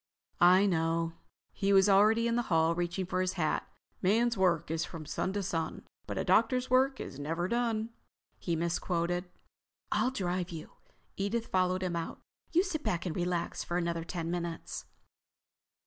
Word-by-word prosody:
"I 185 +3 +7
know." 165 -2 +1 0.4
He 195 0 0
was 195 0 +6
already 215 +4 +5
in 230 - +1
the 240 - +2
hall, 165 -1 +3
reaching 175 +2 -2
for 185 +1 -1
his 185 0 0
hat. 155 -4 -1 0.3
"Man's 230 +5 +3
work 175 -5 +2
is 165 +1 0
from 160 -3 -7
sun 185 - -2
to 205 0 -1
sun, 165 -3 -3 0.2
but - - -4
a - - 0
doctor's 255 -1 +3
work 265 +1 +3
is 135 - -7
never 165 +5 -2
done," 230 0 0 0.5
he 170 - -1
misquoted. 170 +1 -1 0.7
"I'll 255 - +2
drive 180 -7 -2
you." 165 -2 -8 0.5
Edith 220 +4 -1
followed 185 -1 +1
him 180 -2 -1
out. 165 -1 -4 0.3
"You 350 +2 +4
sit 325 -6 -3
back 175 +1 -1
and 170 - -2
relax 175 -1 -1
for 175 - -2
another 170 -1 -1
ten 170 -1 -4
minutes...." 170 -1 -4
180 Hz, 165 wpm, -31 LUFS, 170-205 Hz, 0.7 s, I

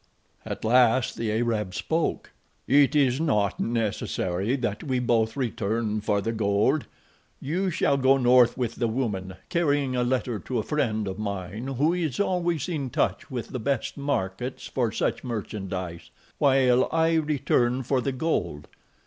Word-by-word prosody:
At - - -5
last 125 +1 +4
the 115 -2 -2
Arab 110 -4 -1
spoke: 160 - -1 0.4
"It 145 +2 +4
is 135 -1 +3
not 105 - +1
necessary 110 -2 -1
that 120 -6 -3
we 130 -4 -1
both 115 -1 +1
return 110 -3 -1
for 105 -1 0
the 115 - -1
gold. 110 +6 +1 0.5
You 180 +7 -1
shall 150 -4 +1
go 135 0 +4
north 125 -1 +5
with 120 -3 -2
the 120 - +1
woman, 105 -6 -2
carrying 145 -6 +1
a 125 - +1
letter 120 -3 -1
to 125 - -4
a 110 - 0
friend 110 -8 -1
of 95 +1 -5
mine 100 +3 -4
who 140 +5 +1
is 165 -7 -2
always 175 -6 0
in 150 -7 -3
touch - - -1
with 125 -4 -5
the 130 - -4
best 135 +1 -1
markets 125 -3 -3
for 120 -4 -1
such - - -1
merchandise, 95 -7 -5 0.3
while 130 -2 +4
I 165 0 +2
return 130 -4 +1
for 130 +1 +1
the 135 - -1
gold. 90 - -2
125 Hz, 155 wpm, -26 LUFS, 110-140 Hz, 0.5 s, north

